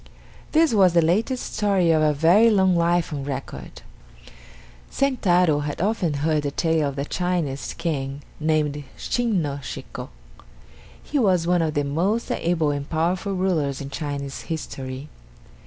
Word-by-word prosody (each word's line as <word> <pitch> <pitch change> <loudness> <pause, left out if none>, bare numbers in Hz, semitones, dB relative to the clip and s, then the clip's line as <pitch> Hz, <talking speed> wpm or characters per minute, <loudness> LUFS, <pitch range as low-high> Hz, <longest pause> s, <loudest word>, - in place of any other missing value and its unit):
This 320 -3 +4
was 190 -5 +5
the 170 - +5
latest 225 +10 0
story 195 -5 +3
of 160 -1 +3
a 155 -1 +4
very 170 +10 +5
long 190 -4 +3
life 170 -1 +1
on 140 -2 -4
record. 135 - -7 1.1
Sentaro 180 - +2
had 145 0 -4
often 185 -6 0
heard 155 -2 +2
the 145 - -2
tale 160 0 +1
of 140 - -7
the 140 0 -2
Chinese 170 -6 -2
King 140 -3 -3 0.2
named 150 -2 0
Shin 230 -8 0
no 140 -1 -3
Shiko. - - -7 0.9
He 290 - -1
was 185 -7 +3
one 175 0 +2
of 160 -1 -1
the 145 - +1
most 180 +11 -1
able 165 -3 +1
and 145 0 -4
powerful 175 +5 0
rulers 165 -7 0
in 140 0 -7
Chinese 140 -2 -4
history. 135 -4 -6
165 Hz, 150 wpm, -23 LUFS, 145-185 Hz, 1.1 s, was